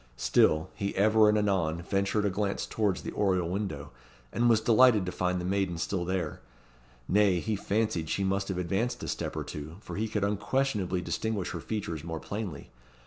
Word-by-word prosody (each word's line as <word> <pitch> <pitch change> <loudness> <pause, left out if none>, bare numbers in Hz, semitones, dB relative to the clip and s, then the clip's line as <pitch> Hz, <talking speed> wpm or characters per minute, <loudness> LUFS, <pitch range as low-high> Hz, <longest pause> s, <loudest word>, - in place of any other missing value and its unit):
Still, 80 +5 +3
he 100 0 -3
ever 110 +1 +5
and 105 - +3
anon 90 -5 0
ventured 100 +2 0
a 100 - +1
glance 100 +1 -1
towards 105 -4 -1
the - - -4
oriel 95 -4 +1
window, 85 -7 -4 0.4
and 120 +1 +3
was 115 -2 +5
delighted 115 -2 +5
to 90 - -3
find 90 0 -1
the 90 - -4
maiden 95 -2 0
still 90 +1 -2
there, 90 -4 -2 0.7
nay, 100 -3 +3
he 110 +4 -1
fancied 100 -5 -1
she 100 - 0
must 95 +1 0
have 95 - -3
advanced 95 +7 -1
a - - -4
step - - -3
or - - -2
two, 75 +2 -7
for - - -8
he 110 +2 0
could 105 -2 -2
unquestionably 105 -2 0
distinguish 95 +4 -2
her 85 - -4
features 85 -8 -4
more 80 -1 -4
plainly. 100 -7 -6
100 Hz, 190 wpm, -29 LUFS, 90-105 Hz, 0.7 s, ever